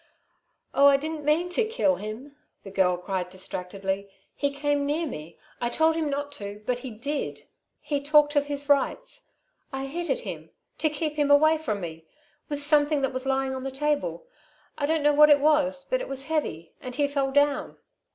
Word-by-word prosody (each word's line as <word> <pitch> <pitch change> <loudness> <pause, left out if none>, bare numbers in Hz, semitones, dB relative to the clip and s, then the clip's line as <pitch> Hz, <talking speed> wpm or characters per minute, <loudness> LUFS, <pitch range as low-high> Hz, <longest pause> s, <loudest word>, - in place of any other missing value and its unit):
"Oh, 280 +1 +6
I 280 -1 +6
didn't 310 +1 -5
mean 320 +4 +2
to 360 +6 +2
kill 440 - +1
him," 225 +7 -7 0.3
the 195 - -9
girl 185 -2 +2
cried 180 0 -3
distractedly. 190 +1 -4 0.2
"He 285 - 0
came 285 0 0
near 300 +4 0
me. 165 - -8 0.2
I 240 - +1
told 320 +5 +2
him 320 -2 -1
not 285 +1 -3
to, 205 +1 -7
but 245 +1 0
he 260 - -6
did. 280 +7 -4 0.4
He 285 -2 -2
talked 295 +1 +4
of 290 0 +3
his 285 0 -4
rights. 400 - 0 0.4
I 270 0 -3
hit 340 +6 -4
at - - 0
him... - - -7 0.3
to 310 - +2
keep 300 0 -3
him 290 -1 +2
away 310 +2 +5
from 215 -10 -3
me... 160 -2 -7 0.4
with 290 -1 -2
something 295 0 +3
that 270 - 0
was 260 +1 -4
lying 270 0 0
on 260 0 -5
the 270 - -2
table. 295 - -1 0.5
I 285 - -1
don't 320 -1 +1
know 295 0 +4
what 300 +1 +7
it 290 -1 +7
was, 285 -2 +2
but - - 0
it - - -5
was 270 +2 -2
heavy 170 - -2
and 250 -1 -6
he 285 0 +2
fell 280 -1 -1
down. 285 +1 +1
285 Hz, 200 wpm, -26 LUFS, 250-300 Hz, 0.5 s, what